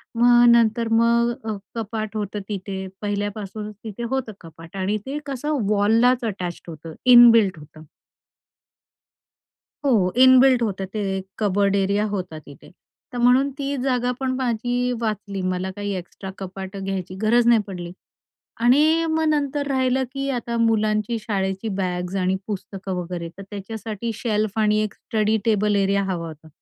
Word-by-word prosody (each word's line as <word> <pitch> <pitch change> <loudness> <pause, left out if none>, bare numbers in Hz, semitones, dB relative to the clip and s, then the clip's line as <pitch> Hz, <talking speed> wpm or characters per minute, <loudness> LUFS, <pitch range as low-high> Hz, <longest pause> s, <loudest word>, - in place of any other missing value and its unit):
मग 240 +1 +5
नंतर 230 0 +3
मग 235 +1 +3
अ, 220 -2 -2 0.2
कपाट 220 -1 -4
होतं 210 0 -3
तिथे 190 -1 -5
पहिल्यापासूनच 205 0 -4
तिथे 220 +2 -6
होतं 265 -4 -2
कपाट 165 +1 -13
आणि 195 +3 0
ते 275 +2 -4
कसं 290 +2 -2
वॉललाच 225 +5 +3
अटॅच्ड 180 -2 -7
होतं. 160 0 -9 0.2
इनबिल्ट 230 -6 +7
होतं. 155 +1 -14 2.0
हो, 210 -9 +3
इनबिल्ट 260 -1 +6
होतं 195 -4 -2
ते, 210 -1 -2 0.4
कबर्ड 200 -1 +2
एरिया 200 +1 +1
होता 185 -5 -4
तिथे. 145 -2 -15 0.4
तर - - -4
म्हणून 255 +3 +4
ती 280 - -4 0.2
जागा 250 -2 +1
पण 265 -1 -1
माझी 245 -1 -1 0.2
वाचली, 210 -3 -3
मला 185 +1 -3
काही 205 0 -4
एक्स्ट्रा 185 +2 -8
कपाटं 195 +1 -7
घ्यायची, 185 -1 -4
गरज 235 +2 +4
नाही 235 -2 +5
पडली. 175 -3 -6 0.7
आणि 305 +6 +4
मग 320 0 +1
नंतर 290 -1 0
राहिलं 260 -1 +1
की 275 0 -3
आता 235 0 -4
मुलांची 215 0 +1
शाळेची 195 -1 -2
बॅग्ज 180 -1 -2
आणि 185 +1 +1
पुस्तकं 195 -2 -5
वगैरे, 175 -1 -4
तर - - -7
त्याच्यासाठी 215 +2 -5
शेल्फ 215 -1 -1
आणि 210 0 +3
एक 215 - -4
स्टडी 220 -2 0
टेबल 210 -2 +2
एरिया 200 +1 +1
हवा 170 -2 -3
होता. 160 0 -12
210 Hz, 145 wpm, -22 LUFS, 190-240 Hz, 2.0 s, इनबिल्ट